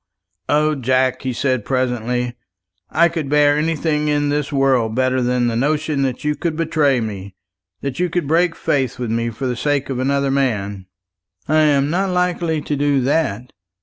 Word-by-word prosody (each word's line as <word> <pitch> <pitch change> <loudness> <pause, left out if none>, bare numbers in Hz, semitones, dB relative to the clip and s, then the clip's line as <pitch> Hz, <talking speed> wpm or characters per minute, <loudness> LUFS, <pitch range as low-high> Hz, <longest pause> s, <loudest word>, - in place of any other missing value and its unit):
"O 155 +1 +3
Jack," 130 -1 +1
he 130 - -2
said 130 -2 -1
presently, 125 -1 -1 0.5
"I 170 +2 +4
could 165 -4 -4
bear 145 0 +4
anything 150 -1 0
in 145 -1 +1
this 145 0 -1
world 130 -5 +2
better 130 0 +1
than 125 0 +1
the 115 -1 0
notion 150 +3 0
that 130 +1 -2
you 150 0 +1
could 165 0 -2
betray 155 -5 +1
me 100 -4 -6 0.5
that 140 0 -4
you 180 0 +1
could 170 -3 -2
break 165 +2 +2
faith 135 -3 -1
with 120 -3 -3
me 115 +1 0
for 115 +4 -6
the 125 -1 -1
sake 145 +1 -1
of 125 - -3
another 140 +1 +1
man." 105 -8 -1 0.6
"I 155 - +2
am 145 -2 +3
not 190 +3 0
likely 175 -3 0
to 145 - -2
do 145 -1 +2
that. 125 -4 -1
140 Hz, 180 wpm, -19 LUFS, 125-150 Hz, 0.6 s, I